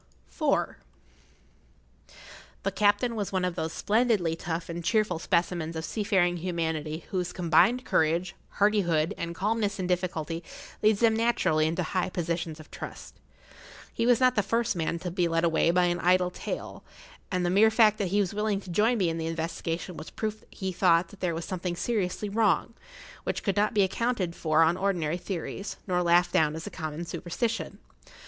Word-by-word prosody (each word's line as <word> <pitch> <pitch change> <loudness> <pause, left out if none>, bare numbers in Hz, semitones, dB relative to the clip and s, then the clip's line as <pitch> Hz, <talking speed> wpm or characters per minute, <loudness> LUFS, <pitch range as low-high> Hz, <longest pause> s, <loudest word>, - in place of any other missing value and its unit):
[Pg - - -1
57] - - +2 1.5
IV. - - -19 0.5
The 195 - 0
captain 210 +4 +2
was 205 -3 -3
one 185 -1 0
of 180 - -1
those 160 -2 -3
splendidly 210 -7 +1
tough 165 0 -4
and 170 -1 -5
cheerful 210 -3 +1
specimens 170 -2 0
of 160 0 -3
seafaring 190 -3 +1
humanity 160 -2 -3
whose 180 -2 -1
combined 185 +9 +3
courage, 170 +3 +1 0.2
hardihood, 180 -7 +2
and 170 0 -5
calmness 205 +1 0
in 185 - -2
difficulty 175 -2 -2 0.4
leads 215 0 +3
them 225 -1 +4
naturally 220 -9 +2
into 170 +3 -1
high 185 +2 -1
positions 170 -2 -3
of 155 - -13
trust. - - -9 0.7
He 230 - 0
was 245 0 +5
not 255 -1 +4
the 230 +1 +1
man 165 0 -1
to 175 +1 -5
be 175 -1 +1
led 165 0 0
away 165 0 +3
by 180 +1 +3
an 175 0 0
idle 180 +1 +3
tale, - - -6 0.5
and 180 -2 0
the 175 - +1
mere 210 +4 +6
fact 220 -1 +4
that 200 - 0
he 200 +3 +1
was 190 -2 -2
willing 210 -1 0
to 190 - -9
join 220 +7 +3
me 190 -4 +2
in 165 0 -2
the 160 - -2
investigation 165 +1 -4
was 155 - -8
proof 215 -1 -4
that - - -26
he 190 -1 -4
thought 170 -1 +3
there 175 -3 -1
was 165 0 -4
something 180 -2 -3
seriously 205 0 -1
wrong, 215 +2 +1 0.5
which - - -3
could 195 - 0
not 210 +1 +1
be 205 - +5
accounted 190 -3 -1
for 155 0 +3
on 165 +2 +2
ordinary 175 -5 0
theories, 190 +2 -5
nor 180 -2 +1
laughed 175 0 +3
down 155 -1 +3
as 160 - -6
a - - -6
common 155 +1 -5
superstition. 200 +7 -3
180 Hz, 185 wpm, -28 LUFS, 165-205 Hz, 1.5 s, mere